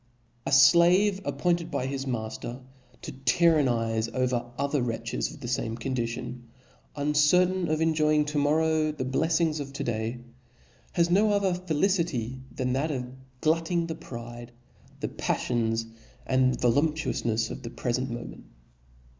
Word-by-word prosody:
A - - -1
flave 175 +8 +6
appointed 175 -2 0
by 125 - -2
hisiib""3V 135 0 -3
mafter 120 +1 -4 0.4
to - - -5
tyrannize 125 -5 +2
over 125 0 -1
other 140 0 0
wretches 115 -1 -2
of 155 -2 -13
the 120 - -5
fame 115 -2 -2
condition, 120 0 -4 0.5
uncertain 155 +5 +3
of 155 0 0
enjoying 155 -2 +3
to 150 0 -1
morrow 155 +1 +2
the 145 -4 -4
bleffings 160 +3 +1
of 140 -1 -6
to - - -4
day, 115 +1 -2 0.8
has 170 0 +2
no 205 +4 +4
other 200 -3 +2
felicity 170 - -1
than 125 -1 -2
that 140 +5 0
ofglutting 145 +6 -2
the 165 - -3
pride, 120 -7 -9 0.5
the - - -1
paffions 115 -2 -1 0.4
and 130 -1 +2
voiuptuouf 150 +6 +1
ncfs 115 -1 0
of - - -7
the 115 - -6
prefent 125 +2 -2
moment. 120 0 -7
140 Hz, 135 wpm, -27 LUFS, 120-160 Hz, 0.8 s, flave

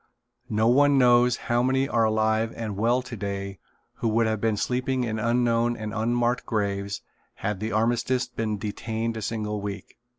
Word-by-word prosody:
No 110 +1 +2
one 140 +3 +5
knows 125 -1 +5
how 120 0 +2
many 130 +2 +2
are 115 -5 +2
alive 110 +1 +1
and 110 -3 -4
well 120 +5 +1
today 100 -5 -5 0.4
who - - -1
would 115 +1 +2
have 110 -2 -1
been 110 -2 +1
sleeping 125 +3 0
in 110 -2 -2
unknown 120 +1 +1
and 110 -1 -5
unmarked 120 +2 0
graves 100 -2 -2 0.3
had 105 -2 -3
the 110 +2 -3
armistice 120 +3 +1
been 115 -3 -3
detained 110 +2 -3
a 110 - -4
single 105 -1 -3
week. 100 0 -7
115 Hz, 165 wpm, -26 LUFS, 105-120 Hz, 0.4 s, one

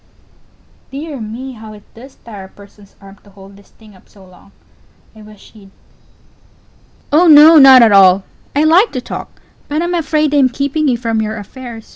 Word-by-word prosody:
Dear 285 0 -9
me, 235 +5 -9
how 220 -3 -13
it 205 -1 -17
does 260 +4 -16
tire 205 -5 -11
a - - -17
person's 200 0 -21
arm 195 0 -17
to 205 - -21
hold 195 0 -18
this 200 0 -22
thing 215 -3 -21
up 185 - -25
so 195 -2 -20
long! 185 +2 -22 0.6
I 215 - -16
wish 210 -1 -18
she'd 205 -3 -19 1.4
Pause. 305 +3 +3
Oh 355 - +2
no, 310 +1 +6
not 265 -3 +7
at 225 - +3
all; 190 -1 +4 0.3
I 290 - +1
_like 345 +8 +2
_to 255 - -6
talk - - -10 0.3
but 305 +3 -4
I'm 350 +1 -4
afraid 310 -3 -2
I'm 275 -3 +2
keeping 280 +4 -3
you 250 -3 -1
from 230 -2 -4
your 220 0 -6
affairs. 230 +2 -12
230 Hz, 190 wpm, -13 LUFS, 205-285 Hz, 1.4 s, not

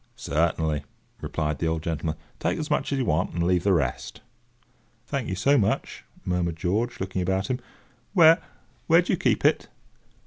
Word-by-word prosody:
"Certainly," 80 -1 0 0.4
replied 75 -2 -2
the 85 - 0
old 80 -1 -1
gentleman; 80 -1 -2 0.2
"take - - 0
as 155 0 -4
much 150 - 0
as 140 - 0
you 130 - 0
want, 80 +1 0
and 85 - 0
leave 90 0 +2
the 100 - +3
rest." 70 -9 -1 0.8
"Thank 135 0 -3
you 95 - -2
so 140 +9 +3
much," 100 - -1 0.2
murmured 90 -2 0
George, 110 +9 -1
looking 95 0 -2
about 95 +6 0
him. 125 - -1 0.5
"Where—where 165 -3 +3
do - - -1
you - - +1
keep - - +1
it?" - - +3
90 Hz, 170 wpm, -25 LUFS, 80-120 Hz, 0.8 s, the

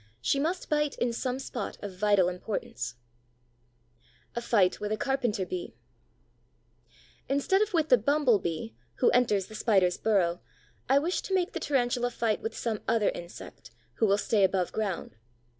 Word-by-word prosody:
She 125 - +1
must 335 +5 -1
bite 300 -1 0
in 245 -1 0
some 250 +2 -2
spot 265 -2 -5
of 200 -2 -6
vital 200 -2 +3
importance. 180 - -4 1.4
A 235 - -2
FIGHT 200 -6 +2
WITH 210 0 -3
A 215 - 0
CARPENTER 240 -6 0
BEE 180 -1 -5 1.5
Instead 285 +9 +2
of 430 0 +1
with 320 -4 +1
the 250 - +6
Bumble 265 -2 +3
bee, 160 -11 -4 0.2
who - - +3
enters 215 -6 +2
the 215 - -13
Spider's 195 -5 +2
burrow, 180 -5 +1 0.5
I 270 - +5
wish 330 +6 0
to 385 - -2
make 370 +2 0
the - - -3
Tarantula 245 -3 +1
fight 230 -3 -1
with 225 - -4
some 225 -3 -2
other 220 -3 +3
insect, 170 0 -9 0.3
who 225 - +3
will 200 0 +4
stay 205 0 +2
above 190 -1 +1
ground. 195 - -3
220 Hz, 160 wpm, -29 LUFS, 190-270 Hz, 1.5 s, the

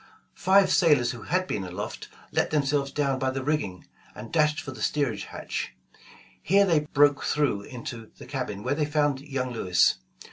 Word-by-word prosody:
Five 195 +1 +4
sailors 150 -9 +4
who 120 - -8
had 185 +7 0
been 100 - -3
aloft, 90 +3 -6 0.2
let - - +1
themselves 140 -2 +1
down 140 -2 0
by 130 0 0
the 130 0 -3
rigging, 130 - -2 0.3
and 115 - -9
dashed 150 -2 +3
for 145 - -6
the 130 - -10
steerage 125 -9 0
hatch. - - -5 0.7
Here 200 +3 +4
they 165 -5 +3
broke 145 0 +4
through 145 -9 +1
into 115 0 -8
the - - -11
cabin, 125 -7 -4
where 130 - 0
they 150 +1 0
found 145 -2 +1
young 135 -3 -3
Lewis. 90 - +3
140 Hz, 175 wpm, -26 LUFS, 120-150 Hz, 0.7 s, Five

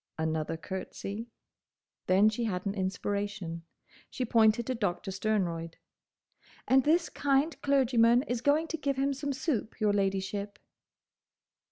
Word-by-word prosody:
Another 160 0 -1
curtsey. 195 +5 -6 0.8
Then 190 +3 +5
she 220 +2 0
had 185 -3 -2
an 200 - -1
inspiration. 195 -2 -3 0.5
She 255 - -3
pointed 225 0 +4
to 260 - -1
Doctor 200 -5 -2
Sternroyd. 180 -5 -1 0.9
"And 265 0 +5
this 330 +4 +3
kind 285 +3 +1
clergyman 250 -3 +4
is 245 -4 -3
going 300 +4 +2
to 325 - -2
give 280 -2 -1
him 275 +1 +1
some 285 +1 -3
soup, 265 -5 -2
your 210 -2 +2
ladyship." 200 +1 -1
215 Hz, 130 wpm, -30 LUFS, 195-265 Hz, 0.9 s, Then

